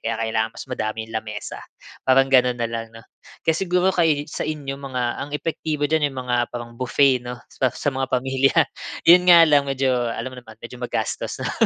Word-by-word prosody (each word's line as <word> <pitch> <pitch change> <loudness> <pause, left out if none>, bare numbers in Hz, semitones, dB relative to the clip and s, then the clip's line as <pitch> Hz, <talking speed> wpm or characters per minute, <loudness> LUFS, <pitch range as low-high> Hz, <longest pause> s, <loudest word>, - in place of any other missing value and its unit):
Kaya 115 0 -2
kailangan 110 0 -1
mas - - -7
madaming 110 -1 -4
lamesa, 105 -1 -5 0.4
parang 135 +1 +3
gano'n 125 -1 +4
na 120 - -2
lang 115 0 -4
'no. 115 - -13 0.4
Kaya 160 - +3
siguro 180 0 +2
kay 155 -4 +2
sa - - -6
inyo 140 -3 -4
mga 130 -2 -4 0.2
ang 145 - -6
epektibo 150 0 -3
diyan, 155 -2 +2
yung 135 - -12
mga 120 -1 0
parang 120 -1 -7
buffet 130 0 +3
'no, 125 0 -7
sa 130 - 0
sa 145 - -1
mga 135 0 -2
pamilya. 130 +1 +1 0.5
Yun 180 +2 +6
nga 170 -1 +9
lang, 145 -3 +3
medyo, 135 -1 0 0.2
alam 130 +3 -5
mo - - -11
naman, 110 -2 -15
medyo 120 +1 -9
magastos 125 - -3
lang. - - -2
130 Hz, 195 wpm, -22 LUFS, 120-145 Hz, 0.5 s, nga